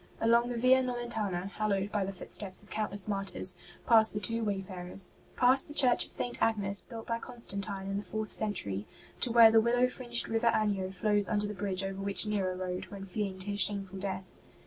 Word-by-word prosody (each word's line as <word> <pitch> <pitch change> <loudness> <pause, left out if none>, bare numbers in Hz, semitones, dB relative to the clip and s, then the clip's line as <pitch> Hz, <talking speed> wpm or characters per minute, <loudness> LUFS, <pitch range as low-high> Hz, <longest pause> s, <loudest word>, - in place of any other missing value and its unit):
Along 235 +1 +3
the 240 - -4
Via 255 +2 +4
Nomentana, 230 -7 -3
hallowed 200 -1 -2
by 205 -2 0
the 195 - -4
footsteps 195 +1 -2
of 205 - -21
countless 205 -2 -3
martyrs, 195 -2 0 0.3
passed 220 -2 +6
the 210 - -2
two 230 +2 -1
wayfarers; 190 -2 -2 0.2
past 255 +2 +6
the 295 - -10
church 250 -4 +5
of - - -11
St. 245 - -3
Agnes, 200 -3 0
built 225 -2 -9
by 230 0 -3
Constantine 200 -5 -3
in 195 0 -3
the - - -2
fourth 215 +2 -5
century; 105 - -1 0.3
to 245 - +2
where 230 -1 +8
the 225 0 +5
willow 245 +2 +2
fringed 245 -2 -2
River 225 +1 0
Anio 200 -3 -1
flows 205 0 +1
under 210 0 0
the 210 - -4
bridge 195 -2 -2
over 195 0 -5
which 200 +2 +3
Nero 195 -3 -1
rode, 180 0 -4
when 195 -1 -9
fleeing 195 0 -4
to 205 +2 -2
his 200 - -3
shameful 195 0 +2
death. 190 -1 -5
205 Hz, 200 wpm, -30 LUFS, 195-230 Hz, 0.3 s, where